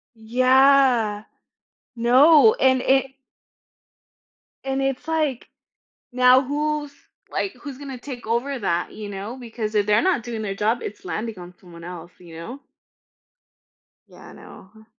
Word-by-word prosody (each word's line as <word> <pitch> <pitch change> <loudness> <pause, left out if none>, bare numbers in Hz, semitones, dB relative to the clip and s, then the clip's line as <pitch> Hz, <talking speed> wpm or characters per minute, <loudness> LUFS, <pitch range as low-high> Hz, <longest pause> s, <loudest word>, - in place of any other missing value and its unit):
Yeah. 250 -2 +3 0.7
No. 285 - +6
And 260 - +2
it 270 0 +1 1.5
and 270 0 -2
it's 270 0 -2
like, 310 -6 -2 0.7
now 255 +1 +5
who's, 295 +1 -3 0.4
like, 390 - -2
who's 280 -3 -9
gonna 275 -2 -8
take 245 -3 -9
over 250 +5 -1
that? 175 -5 -2
You 210 -1 -8
know? 205 +5 -6
Because 225 -3 -6
if 205 -1 +2
they're 210 0 +3
not 345 -10 +1
doing 230 -3 -5
their 195 -2 -4
job, 220 +4 0
it's 210 - -8
landing 220 -2 -5
on 180 0 -11
someone 170 -3 -14
else, 175 0 -9
you 170 -2 -13
know? 235 +11 -8 1.5
Yeah. - - -15
I - - -13
know, 190 - -15
huh. 220 - -18
245 Hz, 140 wpm, -22 LUFS, 210-270 Hz, 1.5 s, No